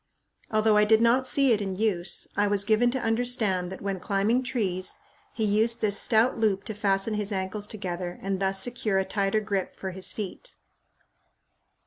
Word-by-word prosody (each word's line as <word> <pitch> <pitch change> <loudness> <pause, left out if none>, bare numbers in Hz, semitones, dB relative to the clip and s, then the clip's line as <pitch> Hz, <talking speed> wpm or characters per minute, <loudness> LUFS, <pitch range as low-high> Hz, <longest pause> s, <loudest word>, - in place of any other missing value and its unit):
Although 215 -1 +3
I 210 - +5
did 220 +1 +4
not 240 +3 +3
see 275 -1 +3
it 215 -2 +2
in 195 -2 -3
use, 190 -4 0
I 205 +1 +2
was 200 -1 +1
given 220 +3 +3
to 260 +2 -2
understand 225 -6 +1
that 190 - -8
when 195 -1 -2
climbing 200 +6 +1
trees, 195 -8 -2 0.3
he 225 - -3
used 220 +3 +2
this 205 -2 +1
stout 225 +1 +3
loop 205 -3 +1
to 220 - -5
fasten 200 +1 0
his 210 0 -2
ankles 195 +2 -3
together 180 -4 -5
and 195 -1 -3
thus 195 0 0
secure 240 -5 -1
a 190 - +1
tighter 200 +2 0
grip 200 -3 -3
for 190 - -5
his 185 +1 -4
feet. 215 - -7
210 Hz, 180 wpm, -26 LUFS, 195-225 Hz, 0.3 s, I